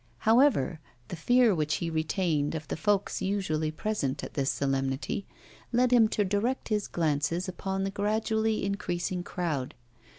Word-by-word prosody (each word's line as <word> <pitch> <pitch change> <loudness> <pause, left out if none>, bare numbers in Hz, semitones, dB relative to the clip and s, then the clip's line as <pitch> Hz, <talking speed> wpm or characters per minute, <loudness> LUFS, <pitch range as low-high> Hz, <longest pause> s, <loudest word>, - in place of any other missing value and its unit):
However, 225 - +3 0.3
the - - -4
fear 245 +6 +4
which 155 -3 0
he 165 -1 -3
retained 160 -1 0
of 155 -1 -5
the - - -3
folks 200 +5 0
usually 185 -6 0
present 155 -5 -2
at - - -7
this 135 -1 0
solemnity 135 +5 -1 0.4
led 250 +1 +3
him 230 -3 +6
to 210 -1 0
direct 210 +8 -1
his 210 -2 0
glances 165 +2 0
upon 190 +1 -3
the 195 - -1
gradually 220 +1 0
increasing 185 -2 -2
crowd. 165 -7 -3
185 Hz, 145 wpm, -28 LUFS, 155-215 Hz, 0.4 s, him